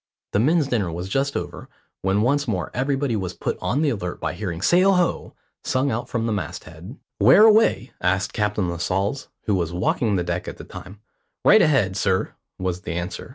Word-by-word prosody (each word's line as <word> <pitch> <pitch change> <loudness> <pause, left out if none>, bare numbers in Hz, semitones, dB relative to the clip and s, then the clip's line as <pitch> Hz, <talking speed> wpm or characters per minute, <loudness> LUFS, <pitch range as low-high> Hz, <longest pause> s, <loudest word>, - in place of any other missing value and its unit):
The 100 - +3
men's 155 +6 +3
dinner 105 -10 -1
was 90 +3 -5
just 135 +7 0
over, - - -7 0.3
when 95 +2 +1
once 140 +3 +1
more 90 -7 -2
everybody 135 -1 0
was 95 -3 -3
put - - -2
on 145 +5 0
the 145 - +2
alert 90 -5 -4
by 80 -1 -3
hearing 90 -2 -5
"Sail 185 +3 +5
ho!" 180 -2 -1 0.3
sung 130 +2 0
out 120 +2 -3
from 115 -2 -1
the 115 - 0
mast 90 -8 -4
head. 85 - -11 0.2
"Where 210 - +7
away?" 220 - +4
asked 95 +1 0
Captain 105 -3 0
Lascelles, 95 +8 -2 0.2
who 105 - 0
was 85 -4 0
walking 100 +4 0
the 90 - 0
deck 90 0 -3
at - - -6
the - - -9
time. 95 +3 -11 0.4
"Right 215 - +7
ahead, 125 - +2
sir," 95 -1 0 0.2
was 90 -1 -3
the 90 -4 -5
answer. 90 +2 -5
105 Hz, 200 wpm, -23 LUFS, 90-135 Hz, 0.4 s, Where